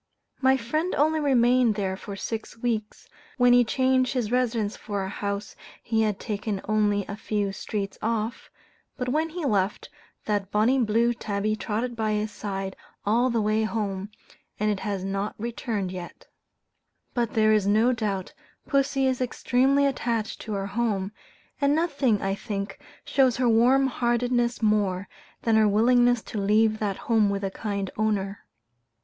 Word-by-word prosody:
My 265 0 +4
friend 310 +9 -1
only 315 +2 +2
remained 250 -5 +3
there 190 -2 -1
for 200 +1 -8
six 225 +3 -5
weeks, 225 -3 -3 0.3
when 245 -1 +5
he 245 0 +6
changed 260 +2 +2
his 240 -4 -1
residence 235 -4 0
for 205 -2 -4
a 190 - -4
house 200 +1 -4 0.3
he 225 -1 +1
had 210 -3 0
taken 210 -2 -3
only 205 -2 +2
a 200 - -6
few 210 -2 -2
streets 200 0 -4
off, 225 +1 -2 0.5
but 250 -2 -2
when 310 +5 +1
he 335 -1 -5
left, 200 -5 0 0.4
that 205 -2 -1
bonnie 225 +6 +3
blue 235 +1 +2
tabby 215 -1 -2
trotted 225 +3 -3
by 220 -1 0
his 210 0 -1
side 195 -2 -4 0.3
all 235 +5 +3
the 230 -3 +1
way 215 +1 +2
home, 205 -3 -2 0.5
and 210 +1 +2
it 200 - -2
has 200 -2 -3
not 195 +2 -2
returned 220 -4 -3
yet. 180 -2 -8 0.9
But 235 -2 -1
there 215 -1 +4
is 210 -2 +2
no 220 +5 +4
doubt 205 -5 -3 0.3
pussy 275 -1 +1
is 260 -1 0
extremely 260 +3 +2
attached 235 -5 -1
to 215 - -5
her 195 -1 -2
home; 200 -2 -1 0.5
and 280 +1 +3
nothing, 280 - +1
I 195 0 0
think, 200 0 -5 0.3
shows 260 -4 +3
her 250 -1 +2
warm 245 +4 +4
heartedness 240 -1 0
more, 200 -3 +1 0.4
than 225 -1 +3
her 215 -1 +5
willingness 245 +3 +4
to 215 - -5
leave 215 +2 +3
that 200 -3 -1
home 220 -3 +3
with 200 0 -2
a 195 - -1
kind 200 -2 -3
owner. 205 -2 -1
220 Hz, 160 wpm, -26 LUFS, 205-245 Hz, 0.9 s, he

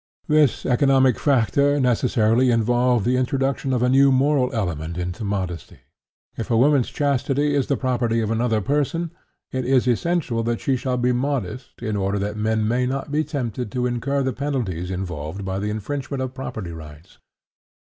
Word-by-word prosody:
This 150 -3 +3
economic 130 -1 +3
factor 140 +2 +2
necessarily 125 -1 +2
involved 120 -1 +2
the 125 +1 +2
introduction 135 +1 0
of 125 -2 +1
a - - +3
new 135 +1 +5
moral 130 -1 +2
element 85 - -3
into 90 +4 -4
modesty. 95 -5 -4 0.5
If 115 - -5
a 115 - +2
woman's 135 0 +3
chastity 145 +1 0
is 140 -2 +1
the 140 - +1
property 120 -3 0
of 110 -1 -1
another 115 -1 +1
person, 150 - -1 0.4
it 130 0 -2
is 130 0 +2
essential 125 -1 0
that 115 0 -1
she 135 - 0
shall 125 0 -2
be 125 0 +2
modest 125 -2 -3
in 110 -3 -2
order 100 0 0
that 100 +1 -2
men 110 0 0
may 125 +2 +1
not 135 +2 -3
be 150 +1 +1
tempted 125 -7 -4
to 125 -1 0
incur 135 +3 -1
the 130 -1 -1
penalties 110 - -3
involved 90 -1 -5
by 95 0 -2
the 105 +1 -2
infringement 130 +5 -3
of 130 0 -5
property 110 -8 -6
rights. 80 0 -12
125 Hz, 170 wpm, -22 LUFS, 105-135 Hz, 0.5 s, new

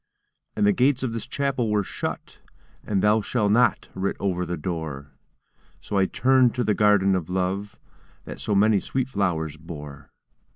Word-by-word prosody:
And - - +2
the 105 - +4
gates 130 +1 +2
of 120 -3 -2
this 115 - -5
Chapel 135 -5 -1
were 105 -1 +1
shut, - - -6 0.4
And 100 -3 -1
'Thou 105 +1 +4
shalt 105 -1 0
not' 120 +4 +3
writ 95 +1 -2
over 90 -3 -1
the 90 +1 -3
door; 75 -4 -5 0.7
So 100 - -2
I 95 - +3
turned 130 -2 +3
to 125 - 0
the 105 - +2
Garden 100 -2 +3
of 90 -3 -3
Love 95 +2 -2 0.5
That - - -8
so 105 - -1
many 105 +1 +4
sweet 130 +4 -2
flowers 80 - -1
bore. 75 -3 -10
100 Hz, 170 wpm, -24 LUFS, 90-110 Hz, 0.7 s, the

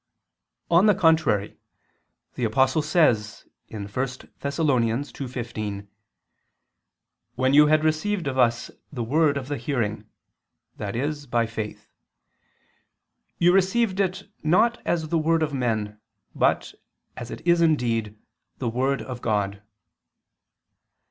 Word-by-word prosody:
On 175 +5 +6
the 210 - +5
contrary, 160 - +2 0.7
The 125 - -5
Apostle 130 +6 +2
says 145 -10 +1 0.2
(1 100 -2 -6
Thess. 130 +5 -3
2:15): 125 -7 -3 1.5
"When 130 +1 +1
you 150 +1 +7
had 155 0 +3
received 165 +4 0
of 135 -2 -2
us 120 -2 +1 0.2
the 125 -5 -4
word 145 +4 +2
of 130 -2 -5
the 145 0 -3
hearing," 110 -4 -2 0.7
i.e. 120 +9 -2 0.2
by 120 -1 +2
faith... 110 -1 -6 1.5
"you 175 +1 +4
received 195 +2 +2
it 190 0 -1
not 225 +10 +2
as 160 -3 0
the 165 - +1
word 160 +1 +2
of 150 -2 -2
men, 110 -5 -2 0.3
but, - - +1 0.4
as - - -7
it - - -9
is 170 0 +4
indeed, 115 -9 +1 0.4
the 125 - -2
word 130 +4 0
of 125 -2 -7
God." 100 -2 -1
135 Hz, 115 wpm, -24 LUFS, 115-160 Hz, 1.5 s, you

